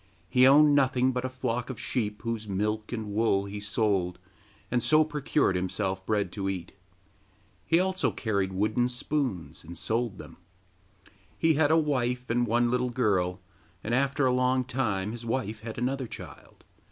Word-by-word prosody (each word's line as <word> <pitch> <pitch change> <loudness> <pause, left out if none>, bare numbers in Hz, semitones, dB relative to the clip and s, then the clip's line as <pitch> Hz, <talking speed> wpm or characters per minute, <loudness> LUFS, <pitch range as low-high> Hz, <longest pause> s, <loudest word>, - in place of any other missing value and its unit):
He 130 0 +6
owned 145 +2 +7
nothing 130 -2 +3
but 125 0 -2
a - - -1
flock 125 -1 -3
of 130 - -6
sheep, 105 -5 -3
whose 115 -2 -3
milk 105 +2 -2
and 110 -4 -4
wool 100 -2 +2
he 100 +1 -6
sold, 100 -3 0 0.5
and 120 0 +2
so 155 +4 +5
procured 150 -7 0
himself 95 +1 -2
bread 105 -2 0
to 95 -2 -3
eat; 90 -3 -5 1.0
he 165 - +4
also 185 0 +1
carried 100 -4 -1
wooden 110 +6 +1
spoons, 125 - -2
and 85 +1 -9
sold 115 +1 -1
them. - - -11 1.0
He 160 -1 +3
had 150 0 +3
a 160 - +5
wife 125 -5 0
and 120 +1 +1
one 120 +1 +2
little 125 0 +1
girl, 100 -7 0 0.4
and 115 - -2
after 140 +2 +2
a 130 - +3
long 130 0 +2
time 110 -6 -1
his 120 0 -7
wife 115 -2 -2
had 110 +1 -7
another 130 +1 -1
child. - - -11
120 Hz, 165 wpm, -28 LUFS, 105-130 Hz, 1.0 s, owned